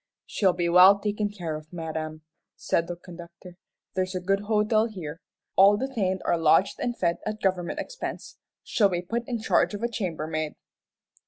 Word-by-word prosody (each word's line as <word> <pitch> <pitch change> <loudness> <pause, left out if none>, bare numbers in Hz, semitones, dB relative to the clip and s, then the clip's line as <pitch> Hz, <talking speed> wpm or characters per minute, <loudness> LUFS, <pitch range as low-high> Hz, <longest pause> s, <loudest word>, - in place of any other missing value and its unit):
"She'll 190 -4 +2
be 175 -1 -1
well 180 +3 +8
taken 210 +1 -1
care 175 -6 -5
of, 155 0 -10
madam," 160 -2 -5 0.3
said 165 - 0
the 175 - -4
conductor. 175 0 -12 0.4
"There's 185 0 -2
a - - 0
good 195 +2 +1
hotel 215 +1 +2
here. 165 -7 -8 0.3
All 200 +2 +7
detained 210 -7 -1
are 170 - +2
lodged 165 +4 +3
and 240 -1 -2
fed 170 -1 +1
at 215 0 -4
government 185 -4 -1
expense. - - -6 0.2
She'll 205 -3 +2
be 175 -1 -2
put 235 +6 -3
in 240 -2 -2
charge 210 - +2
of 205 - -7
a - - +2
chambermaid." 155 -8 -3
185 Hz, 170 wpm, -26 LUFS, 170-210 Hz, 0.4 s, well